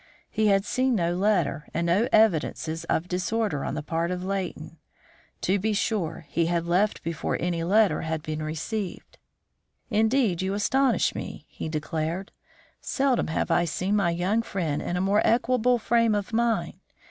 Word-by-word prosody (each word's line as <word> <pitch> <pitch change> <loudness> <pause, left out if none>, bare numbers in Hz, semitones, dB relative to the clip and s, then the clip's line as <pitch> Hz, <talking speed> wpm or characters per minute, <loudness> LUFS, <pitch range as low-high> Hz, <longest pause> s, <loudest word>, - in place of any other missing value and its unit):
He 215 0 +1
had 195 -1 +3
seen 255 +3 +1
no 170 -3 +1
letter 185 -5 +1
and 170 +1 0
no 190 +8 +2
evidences 165 -5 +2
of 165 +1 0
disorder 180 -3 -1
on - - -3
the 155 - -4
part 165 +2 -1
of 180 0 -3
Leighton. 180 -4 -4 0.6
To 195 +2 +1
be 215 +3 0
sure, 200 -6 -1
he 165 +3 0
had 170 -1 0
left 185 +5 +1
before 165 -2 -2
any 170 -1 -1
letter 205 +3 +3
had 160 -1 -3
been 155 0 -4
received. 170 +6 -5 0.7
"Indeed, 220 -3 +2
you 190 +1 -1
astonish 260 +5 +2
me," - - -7
he - - -6
declared. 160 +4 -3 0.5
"Seldom 270 -2 +1
have 160 - -1
I 175 - +3
seen 185 +5 -1
my 195 -4 +2
young 180 +6 +1
friend 170 -9 -2
in 175 - -2
a - - 0
more 200 +2 +3
equable 245 +1 +3
frame 230 -1 +2
of 205 +3 -3
mind. 230 0 0
185 Hz, 165 wpm, -26 LUFS, 165-220 Hz, 0.7 s, had